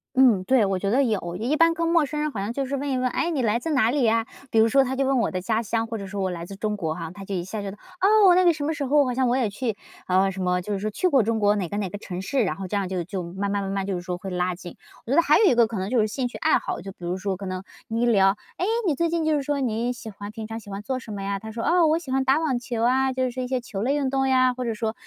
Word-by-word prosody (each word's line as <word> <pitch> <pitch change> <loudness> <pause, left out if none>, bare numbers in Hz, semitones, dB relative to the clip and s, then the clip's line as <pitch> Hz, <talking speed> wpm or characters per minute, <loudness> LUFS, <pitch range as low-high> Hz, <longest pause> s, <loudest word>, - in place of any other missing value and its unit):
嗯， 245 -8 +5
对， 250 +1 +3
我 195 -1 0
觉 195 +2 -2
得 260 +6 +3
有。 190 -8 -2
也 220 +5 -3
一 295 - +2
般 330 +1 +4
跟 335 0 -1
陌 335 -2 +3
生 300 +2 -4
人 305 0 -1
好 205 - -4
像 205 +3 -2
就 275 +3 -2
是 275 +2 -3
问 280 +1 -2
一 260 - 0
问： 255 0 +1
“诶， 330 +6 -1
你 295 -5 0
来 230 -1 +1
自 325 - -4
哪 255 -7 +3
里 285 -1 +1
呀？” 225 0 +2 0.2
比 225 - +3
如 220 - +6
说， 270 +4 +4
他 265 0 -2
就 270 +1 0
问 265 -1 +2
我 230 - 0
的 185 - -2
家 220 +4 0
乡， 225 +1 -1
或 225 0 -4
者 200 - -6
说 195 +1 -4
我 190 - 0
来 170 -1 -5
自 195 +2 -9
中 210 +1 -1
国 165 -6 -2
哈， 165 -2 -6
他 200 0 -9
就 195 - -6
一 175 -2 -2
下 210 +3 -5
觉 200 -1 -5
得 205 - -12 0.2
哦， 395 -2 +6
那 370 - +5
个 350 - +6
什 300 -3 -4
么 315 - 0
时 290 -2 -3
候 290 +1 +4
好 250 - -1
像 255 0 +1
我 245 - +2
也 240 -5 +1
去， 220 +1 -3 0.3
啊， 190 +1 +3
什 190 0 -5
么， 180 0 +1
就 205 +3 -4
是 195 - -2
说 215 +2 -2
去 290 - 0
过 275 -9 +4
中 225 +1 0
国 205 0 +3
哪 190 -5 -2
个 205 - -3
哪 200 -3 -2
个 205 - -6
城 185 -3 -6
市， 255 +6 0
然 190 - -2
后 195 -1 -5
这 205 - -3
样 195 -2 -1
就 180 -3 -2
就 190 0 -4
慢 190 +4 -4
慢 200 0 -1
慢 195 - -3
慢 195 -1 -1
就 195 -1 -2
是 175 - -4
说 180 0 -4
会 190 +2 -7
拉 180 0 -1
近。 175 -1 -10 0.3
我 235 - -5
觉 - - +3
得 335 - +7
还 300 - +5
有 440 - +5
一 365 - +5
个 235 -1 +5
可 220 -3 -4
能 190 +1 -3
就 250 - +2
是 215 - +1
兴 250 +4 -2
趣 245 - -8
爱 315 - +3
好， - - -4
就 195 +2 -7
比 180 -2 -11
如 175 +1 -1
说 190 0 -3
可 195 - -7
能 185 0 -4 0.2
你 225 +1 -2
一 - - +3
聊： 195 -5 +5 0.3
“诶， 360 - 0 0.2
你 320 -6 +2
最 335 +4 +1
近 335 0 -1
就 315 -1 +2
是 285 - -2
说 285 0 -1
你 240 0 -1
喜 230 -2 -9
欢 205 0 -8
平 220 +1 -7
常 225 +1 -6
喜 210 - -14
欢 200 0 -5
做 260 +2 -2
什 230 - -10
么 200 -1 -5
呀？ 200 0 -2
“他 220 +2 -8
说： 230 0 -4
“哦， 345 -1 +4
我 310 +1 +3
喜 285 -6 -8
欢 265 0 +1
打 265 +2 +4
网 305 -6 0
球 235 -2 -3
啊， 260 +2 +2
就 260 0 -1
是 255 - 0
说 255 +1 -4
一 250 - -3
些 255 -1 -1
球 200 -4 -6
类 265 +6 +1
运 280 -2 0
动 270 0 +1
呀“， 255 -1 +4
或 250 0 -4
者 230 - -1
说：” 220 0 -2
225 Hz, 385 characters per minute, -24 LUFS, 195-265 Hz, 0.3 s, 得